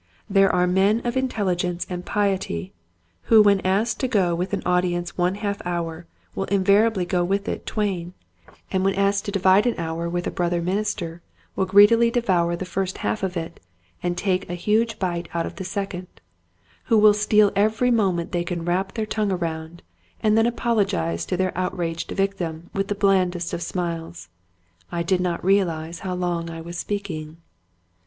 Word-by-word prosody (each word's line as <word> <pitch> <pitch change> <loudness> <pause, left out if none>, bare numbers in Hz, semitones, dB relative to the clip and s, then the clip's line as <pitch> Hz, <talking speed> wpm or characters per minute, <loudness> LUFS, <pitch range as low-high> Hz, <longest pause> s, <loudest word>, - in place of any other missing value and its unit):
There 195 -1 +4
are 180 0 +2
men 195 +6 +2
of 240 +1 -1
intelligence 185 -9 -1
and 180 -1 -5
piety 190 - -1 0.6
who 225 - +8
when 200 -1 +4
asked 200 +5 0
to 260 - 0
go 190 -8 +2
with 180 +2 -2
an - - -2
audience 175 -1 0
one 180 +1 +1
half 205 -1 -3
hour 170 -1 -4 0.3
will 195 - -2
invariably 200 0 +3
go 175 0 0
with 200 +3 -1
it - - -4
twain; 185 -5 -2 0.6
who 190 - +1
when 195 0 +1
asked 200 +1 +1
to 205 - -3
divide 195 +2 +4
an 240 - +1
hour 165 0 -3
Meanness. - - -1
i6i - - -4
with 175 0 -1
a - - -2
brother 175 -1 0
minister 180 -2 -2 0.3
will 190 - 0
greedily 205 +5 +6
de 245 - +1
vour 175 -6 +1
the 185 - -5
first 185 +1 -3
half 215 - -1
of 190 -2 -2
it 165 0 -5 0.4
and 175 0 -2
take 185 -1 -1
a 175 - -3
huge 215 +4 +1
bite 175 -3 -2
out 170 - 0
of - - -8
the - - -4
second; 185 0 -4 0.8
who 225 - +3
will 210 0 +7
steal 210 0 +3
every 220 +5 +2
moment 190 -7 +1
they 175 -1 0
can 175 -1 -4
wrap 185 +2 -1
their 220 -2 -1
tongue 215 -1 -1
around, 165 -2 -4 0.4
and 215 -1 +2
then 225 +1 +4
apologize 195 - 0
to 180 - -1
their 185 0 0
out 185 +1 -2
raged 165 -1 -3
victim 175 -4 -3
with 195 0 -1
the 205 - -1
blandest 185 -4 +1
of - - -3
smiles, 165 - -4 0.3
" 85 0 -36
I 170 -1 -1
did 180 +1 +1
not 175 -1 -2
realize 170 -4 +1
how 185 -2 -4
long 175 -2 -2
I 165 0 -7
was 170 +1 -8
speak 200 -2 -3
ing 155 0 -7
185 Hz, 190 wpm, -23 LUFS, 170-200 Hz, 0.8 s, who